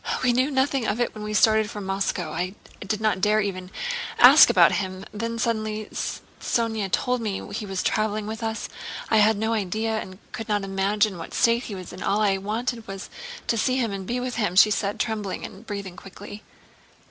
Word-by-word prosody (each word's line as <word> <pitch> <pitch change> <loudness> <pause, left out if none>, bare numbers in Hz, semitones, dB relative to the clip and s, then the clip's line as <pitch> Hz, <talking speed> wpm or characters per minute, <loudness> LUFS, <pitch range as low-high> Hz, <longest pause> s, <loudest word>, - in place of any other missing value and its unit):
"We 250 -1 +4
knew 255 +3 +2
nothing 265 -3 +1
of 225 - -1
it 240 - 0
when 215 - -8
we 210 0 -3
started 220 0 +4
from 205 -1 -6
Moscow. 195 +1 -1
I 180 +3 -3 0.2
did 205 +2 -3
not 215 -4 +1
dare 210 +1 +3
to 185 -3 -3 0.5
ask - - +9
about - - +6
him. 190 -1 -3
Then 230 +2 -3
suddenly 215 -2 -2
Sónya 220 -4 -2
told 250 +3 +1
me 200 -2 -4
he 210 0 -4
was 190 -1 -2
traveling 215 0 0
with 220 +2 -5
us. 225 0 -3 0.4
I 220 - +5
had 215 0 +5
no 220 +2 0
idea 220 +2 -1
and 185 -2 -8
could 225 -1 -6
not 205 -1 +1
imagine 195 0 0
what 165 - -7
state 235 +2 +3
he 205 - -6
was 185 -2 -8
in, 185 - -9
all 200 +2 +1
I 200 -2 +2
wanted 225 +3 -3
was 195 0 -7 0.3
to 230 - 0
see 255 +4 +1
him 235 -5 0
and 195 -1 -5
be 245 +1 -1
with 250 0 -4
him," 205 -6 0
she 210 +3 +7
said, 200 0 -1
trembling, 215 -4 -2
and 210 +5 -11
breathing 200 -3 -5
quickly. 205 +2 -10
215 Hz, 205 wpm, -25 LUFS, 195-225 Hz, 0.5 s, ask